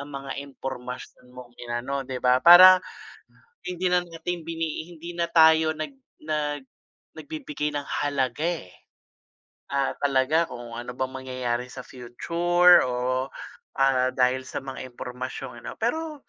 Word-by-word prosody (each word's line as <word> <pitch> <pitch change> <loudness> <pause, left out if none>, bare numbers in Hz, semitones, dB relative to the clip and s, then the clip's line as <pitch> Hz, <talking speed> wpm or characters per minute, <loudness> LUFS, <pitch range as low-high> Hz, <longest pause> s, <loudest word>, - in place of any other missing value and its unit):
ang 140 0 -7
mga 135 0 -6 0.2
impormasyon 125 -1 -8
mong 125 -1 -11
inano, 120 +3 -3
'di 130 - -4
ba, 125 +1 +4
para, 185 +2 +10 0.9
hindi 180 0 -1
na 180 0 +2
nating 165 0 -5
bini 165 -1 -3
i 175 - -13
hindi 170 +2 -9
na 170 - +1
tayo 160 -1 +5
nag 155 0 -5 0.3
nag 150 -2 -2 0.6
nagbibigay 150 -1 -5
ng 145 -1 -3 0.2
halaga, 140 +1 -1 0.2
eh. 90 - -15 1.0
Ah, 140 -1 0
talaga 140 +4 +3
kung 120 -1 -8
ano 120 +1 -6
bang 130 +1 -2
mangyayari 130 -2 -3
sa 130 - -8
future 170 +9 +3
o, 125 +1 -1 0.6
ah, 130 -1 +3
dahil 130 +1 +1
sa - - -5
mga 135 -1 -7
impormasyong 125 0 -7
ano - - -6
pero 305 +5 -2
140 Hz, 140 wpm, -25 LUFS, 125-165 Hz, 1.0 s, para